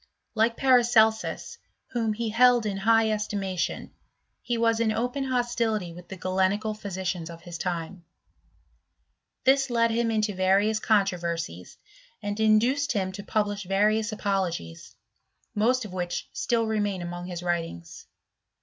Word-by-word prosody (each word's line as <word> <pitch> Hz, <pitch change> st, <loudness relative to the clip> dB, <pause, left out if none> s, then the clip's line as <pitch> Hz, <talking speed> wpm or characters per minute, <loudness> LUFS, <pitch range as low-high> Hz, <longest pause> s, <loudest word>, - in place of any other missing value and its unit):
Like 230 Hz, +1 st, +2 dB
Paracel 240 Hz, -4 st, +5 dB, 0.8 s
whom 225 Hz, -3 st, 0 dB
he 230 Hz, +1 st, -3 dB
held 240 Hz, +1 st, +4 dB
in 200 Hz, -2 st, -2 dB
high 225 Hz, +2 st, +3 dB
estimation, 200 Hz, -4 st, -2 dB, 0.5 s
he 240 Hz, -, -2 dB
was 230 Hz, 0 st, +2 dB
in 230 Hz, -1 st, +2 dB
open 245 Hz, +5 st, -1 dB
tility 235 Hz, -7 st, -1 dB
with 175 Hz, +1 st, -12 dB
the 190 Hz, -, -7 dB
Galenical 190 Hz, +4 st, 0 dB
physicians 190 Hz, -4 st, -4 dB
of 165 Hz, 0 st, -11 dB
his 175 Hz, -1 st, -8 dB
time, 175 Hz, 0 st, -4 dB, 1.7 s
led 230 Hz, -1 st, +2 dB
him 230 Hz, 0 st, +1 dB
into 215 Hz, -2 st, 0 dB
various 195 Hz, +3 st, +2 dB
controversies, 170 Hz, -, -1 dB, 0.4 s
and 205 Hz, +1 st, -4 dB
induced 230 Hz, +7 st, +3 dB
to 190 Hz, -4 st, 0 dB, 0.2 s
publish 205 Hz, -1 st, 0 dB
various 210 Hz, +3 st, +2 dB
apologies; 190 Hz, -, -3 dB, 0.6 s
most 235 Hz, +3 st, +2 dB
of 195 Hz, -, -9 dB
which 175 Hz, -1 st, -3 dB
si 235 Hz, -, 0 dB, 0.2 s
main 200 Hz, -3 st, -1 dB
among 175 Hz, +1 st, -6 dB
his 175 Hz, -1 st, -6 dB
writings. 165 Hz, -, -4 dB
210 Hz, 125 wpm, -26 LUFS, 180-225 Hz, 1.7 s, Paracel